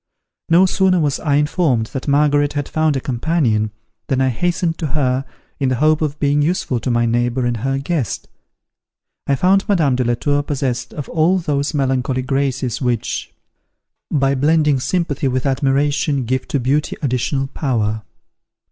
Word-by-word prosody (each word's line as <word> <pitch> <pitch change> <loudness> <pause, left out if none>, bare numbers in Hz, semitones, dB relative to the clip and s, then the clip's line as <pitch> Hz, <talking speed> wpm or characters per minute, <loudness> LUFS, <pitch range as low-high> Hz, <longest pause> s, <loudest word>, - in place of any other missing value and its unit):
No 175 +3 +6
sooner 185 -1 +2
was 145 -4 0
I 145 -3 0
informed 150 -5 +1
that 135 - -5
Margaret 145 0 +2
had 145 -1 -2
found 155 -2 +1
a - - 0
companion, 120 -4 0 0.4
than 130 - 0
I 130 0 +3
hastened 170 +5 -1
to 160 - -1
her, 130 -1 +1 0.3
in 135 -2 +1
the 130 - +1
hope 155 +4 +2
of 150 -1 -1
being 145 0 +2
useful 145 -6 0
to 120 - -3
my 120 -1 +2
neighbour 120 +2 0
and 120 -1 0
her 135 +4 -1
guest. 140 -3 -2 1.0
I 140 - +3
found 195 +7 +2
Madame 155 -10 +3
de 125 - +1
la 120 0 +1
Tour 145 +3 0
possessed 130 -4 -3
of 145 - -5
all 170 +3 +2
those 150 -3 -1
melancholy 130 -2 0
graces 135 -2 -1
which, 120 -3 -2 0.8
by 135 -2 +2
blending 150 0 +2
sympathy 145 0 -1
with 130 -1 -1
admiration 140 0 +1
give 130 +2 -2
to 140 - -1
beauty 140 +5 0
additional 135 +1 0
power. 115 -6 -1
140 Hz, 165 wpm, -19 LUFS, 130-150 Hz, 1.0 s, No